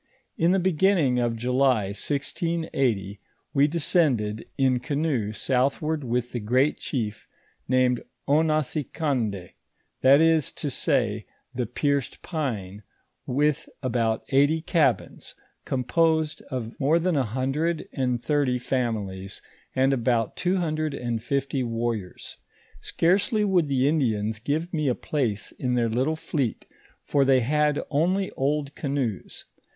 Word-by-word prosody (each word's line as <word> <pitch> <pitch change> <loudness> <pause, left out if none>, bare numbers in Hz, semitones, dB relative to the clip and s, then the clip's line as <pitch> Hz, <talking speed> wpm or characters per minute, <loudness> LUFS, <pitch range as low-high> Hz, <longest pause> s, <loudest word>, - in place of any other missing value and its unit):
In 165 - +2
the 190 - +3
beginning 175 -7 +2
of 120 -1 0
July, 125 -3 +2
1680, 135 - -2 0.3
we 140 0 +4
descended 145 - +1
in 130 -2 +3
canoe 140 -5 -1
southward 140 +6 0
with 120 0 -1
the 120 - -3
great 130 +7 +1
chief 110 -6 -4 0.4
named 125 -1 +2 0.3
Ouasicoudd, 145 - 0 0.5
that 135 +2 +7
is 160 -2 +3
to 145 - -4
say, 115 -8 0 0.3
the 125 -2 -2
Pierced 140 +2 -1
pine, 105 - -4 0.5
with 145 +3 0
about 115 -3 0
eighty 145 +4 +3
cabins, 160 -1 0 0.3
composed 160 +4 +1
of 120 -3 -4
mo 150 +5 +3
than 170 0 +1
a 140 - +3
hundred 135 +8 -1
and 125 -3 0
thirty 140 -1 +1
families, 105 -7 -3 0.4
and 135 +1 +3
about 120 -3 0
two 180 +1 0
hundret. 155 -3 -1
and 120 -2 -2
fifly 135 +2 -1
warriors. 115 -5 -4 0.4
Scarcely 200 +5 +1
would 180 -6 +2
the 135 -1 +2
Indians 110 -8 0
give 155 +9 -2
me 155 -3 0
a 125 - +2
place 120 -9 -2
in 125 -1 0
their 120 -2 +1
little 130 +8 0
fleet, 150 -6 -2 0.4
for 140 - +2
they 135 -1 +4
had 150 +3 +1
only 180 +6 +1
oid 140 +1 -1
canoes. 135 - -3
135 Hz, 125 wpm, -25 LUFS, 120-155 Hz, 0.5 s, that